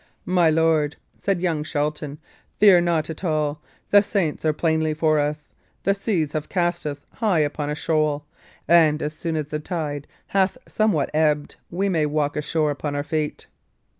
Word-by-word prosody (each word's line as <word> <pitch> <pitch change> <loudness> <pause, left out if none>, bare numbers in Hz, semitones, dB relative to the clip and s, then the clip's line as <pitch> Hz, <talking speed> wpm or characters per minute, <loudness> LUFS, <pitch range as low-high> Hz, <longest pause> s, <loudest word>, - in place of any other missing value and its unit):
"My 180 -3 +3
lord," 160 -1 +2 0.2
said 195 -3 -1
young 160 -4 0
Shelton, 150 -1 -2 0.4
"fear 200 -4 +7
not 165 -2 0
at 160 - -9
all; 150 -3 0 0.3
the 205 - +8
saints 195 -6 -1
are 155 - +3
plainly 160 0 0
for 155 -1 +2
us; 150 +1 -2 0.3
the 200 - +3
seas 195 -7 -1
have 155 -1 -4
cast 175 -3 0
us 145 -1 -6
high 205 -8 +2
upon 145 0 -1
a 150 - -1
shoal, 150 -1 0 0.4
and 155 -2 +5
as 150 +1 -2
soon 165 +1 -3
as 150 -2 -2
the 150 - -2
tide 150 -3 -4 0.2
hath 195 +3 +2
somewhat 215 -9 +1
ebbed, 150 -1 +1
we 190 +3 -1
may 160 -6 +1
walk 145 -1 0
ashore 150 0 0
upon 145 0 -4
our 145 - -1
feet." 155 0 -3
155 Hz, 170 wpm, -23 LUFS, 150-175 Hz, 0.4 s, the